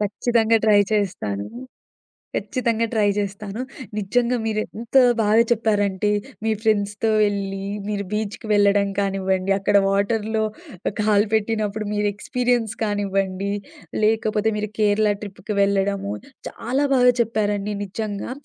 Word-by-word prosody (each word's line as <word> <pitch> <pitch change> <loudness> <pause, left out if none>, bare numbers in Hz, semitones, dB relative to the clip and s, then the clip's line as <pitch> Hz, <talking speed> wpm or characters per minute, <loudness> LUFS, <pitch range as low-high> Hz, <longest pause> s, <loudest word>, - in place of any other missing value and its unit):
ఖచ్చితంగా 225 +2 +2
ట్రై 210 -2 +6
చేస్తాను. 180 - -1 0.9
ఖచ్చితంగా 230 -3 0
ట్రై 215 -3 +2
జేస్తాను. 205 +2 -4 0.4
నిజంగా 240 +5 +1
మీరెంత 220 +2 -3 0.2
బాగా 215 +1 +4
చెప్పారంటే, 210 -3 +1 0.3
మీ 225 - +1
ఫ్రెండ్స్‌తో 210 0 +1
వెళ్లి, 195 -1 -1 0.2
మీరు 205 -1 -2
బీచ్‌‌కి 215 +1 -3
వెళ్ళడం 200 -1 +4
కానివ్వండి. 190 -1 0
అక్కడ 200 +1 0
వాటర్‌‌‌‌‌‌‌‌‌‌‌‌‌‌‌‌‌‌‌‌లో, 220 +2 +1 0.6
కాలు 210 0 +3
పెట్టినప్పుడు 215 -1 0
మీరు, 210 0 0
ఎక్స్‌పిరియన్స్ 245 -1 0
కానివ్వండి, 195 -2 -1 0.5
లేకపోతే 215 0 +2
మీరు 210 0 -2
కేరళ 210 0 +3
ట్రిప్‌కి 210 +1 -6
వెళ్ళడము, 200 0 +1 0.4
చాలా 260 +5 -1
బాగా 250 -1 +6
చెప్పారండి. 210 -2 0
నిజంగా. 205 +1 -4
210 Hz, 105 wpm, -22 LUFS, 200-220 Hz, 0.9 s, ట్రై